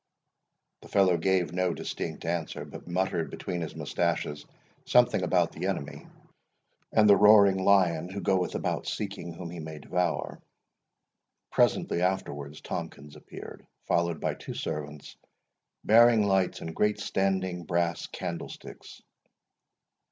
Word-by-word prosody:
The - - -13
fellow 95 -3 +3
gave 90 -1 +1
no 90 -1 0
distinct 80 -1 -5
answer, 85 -1 -3
but - - -11
muttered 90 -1 -1
between 90 -1 -5
his 80 - -5
mustaches 75 0 -2 0.4
something - - +4
about - - +2
the - - -4
Enemy, 70 - -4 0.8
and 110 -1 +5
the 100 - +8
roaring 100 -2 +6
Lion 90 -4 +3
who 100 +1 -5
goeth 95 -2 0
about - - -2
seeking 85 - -4
whom 85 0 -8
he 85 - -7
may 80 0 -7
devour. 90 +2 -2 1.1
Presently 85 - +2
afterwards 75 -6 -2
Tomkins 70 +1 -6
appeared, - - -11 0.2
followed 85 -2 0
by - - -1
two - - -8
servants, 75 -1 -6 0.7
bearing 115 0 +6
lights 95 -2 +1
in 80 - -6
great 105 +3 +1
standing 95 -3 -1
brass 85 -1 -1
candlesticks. 85 - -8
90 Hz, 125 wpm, -28 LUFS, 80-95 Hz, 1.1 s, the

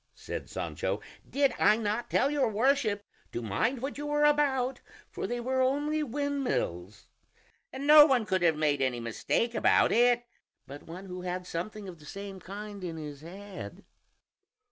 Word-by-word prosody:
said - - -6
Sancho, - - -3 0.3
"did 275 -2 +2
I 210 +1 +5
not 220 +1 -2
tell 280 - +2
your 290 -2 +2
Worship 220 -2 +1 0.3
to - - -2
mind 230 - -1
what 280 +1 -4
you 295 - -4
were 295 0 +1
about, 275 -3 +2 0.3
for - - -4
they 240 0 -2
were 260 +2 0
only 290 +4 +1
windmills? 255 - -2 0.7
and 270 +2 -5
no 300 0 +10
one 255 -6 +2
could 190 -3 0
have 165 -3 +3
made 145 -2 +1
any 130 -2 0
mistake 120 - -1
about - - +4
it 240 +1 +4 0.4
but 140 +2 -11
one 180 +4 -8
who 180 -1 -7
had 180 0 -4
something 200 +5 -5
of 175 -3 -9
the 150 - -15
same 195 +3 -7
kind 200 +2 -8
in 165 -2 -4
his 150 -2 -7
head." 190 +4 -9
215 Hz, 165 wpm, -29 LUFS, 175-270 Hz, 0.7 s, no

